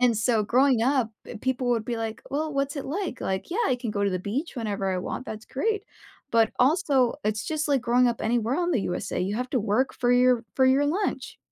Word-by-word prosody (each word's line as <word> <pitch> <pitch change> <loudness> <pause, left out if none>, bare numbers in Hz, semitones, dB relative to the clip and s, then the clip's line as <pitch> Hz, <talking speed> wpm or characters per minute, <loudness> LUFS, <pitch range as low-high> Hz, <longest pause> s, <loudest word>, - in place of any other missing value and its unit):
And 245 -3 +4
so, 220 0 +2
growing 255 0 +3
up, 260 -3 +2 0.2
uh, - - -7
people 255 -1 0
would 230 -2 +1
be, 240 -1 -3
like, 225 -1 -4
"Well, 305 +2 -1
what's 275 +1 -1
it 280 - -4
like?" 335 -1 -3
Like, 190 - -3
"Yeah, 380 - -2
I 250 - +2
can 240 -3 -4
go 200 -1 0
to 200 - +1
the 185 - -1
beach 255 - -3
whenever 200 -4 -2
I 185 - -1
want." 220 - -4
That's 215 0 -7
great, 420 +9 -1 0.5
but 225 -1 +4
also, 270 -2 +3
it's 215 0 -1
just 310 -1 -1
like 275 -3 +3
growing 245 +1 +3
up 235 - -2
anywhere 235 +3 +1
on 350 0 0
the 235 - +2
USA, 190 - -3
you 195 +3 -1
have 250 +1 -3
to 255 - +1
work 225 +5 0
for 245 0 +1
your 245 -1 +4
for 260 -1 +5
your 270 +2 +4
lunch. 370 +8 -2
250 Hz, 240 wpm, -26 LUFS, 220-275 Hz, 0.5 s, for